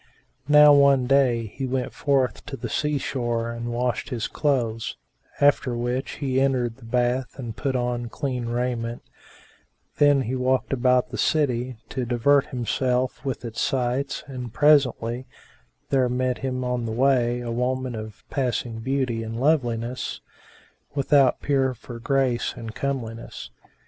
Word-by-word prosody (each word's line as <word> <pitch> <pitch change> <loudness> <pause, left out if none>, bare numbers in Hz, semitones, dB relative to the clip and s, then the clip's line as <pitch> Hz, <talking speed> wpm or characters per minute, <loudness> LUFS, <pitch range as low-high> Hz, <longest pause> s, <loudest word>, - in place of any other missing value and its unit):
Now 150 0 +8
one 140 -2 +5
day 125 -3 +3
he 130 +5 -5
went 130 -1 -2
forth 135 -3 0
to 140 -2 -5
the 120 0 -5
sea 150 +5 0
shore 120 -4 -2
and 115 0 -5
washed 120 0 -1
his 120 -3 -2
clothes; 120 -6 -1 0.4
after 140 -4 +3
which 120 +2 -2
he 135 -2 0
entered 125 -4 +1
the 125 - -14
bath 125 +2 0
and 120 -5 -6
put 135 +1 -2
on 120 -1 -1
clean 125 -2 -3
raiment; 120 -1 -2 0.9
then 145 -2 +5
he 125 - -3
walked 130 0 0
about 125 -1 +2
the - - -5
city, 130 -5 +1
to 130 - -3
divert 130 +4 +3
himself 125 0 -1
with 135 -3 -4
its 115 0 -4
sights 130 0 -1
and 125 -4 -7
presently 130 -4 +3 0.6
there 130 -2 +3
met 125 0 -1
him 130 -1 -2
on 125 -2 -1
the - - -3
way 125 0 +2
a 120 -1 -4
woman 125 +1 -1
of 110 -2 -8
passing 120 -4 -1
beauty 130 -2 -1
and 115 +1 -5
loveliness, 125 -4 0 0.8
without 140 -1 +3
peer 135 -3 +1
for 120 +1 -10
grace 130 -1 0
and 115 -1 -7
comeliness. 115 -5 -5
125 Hz, 145 wpm, -24 LUFS, 120-135 Hz, 0.9 s, Now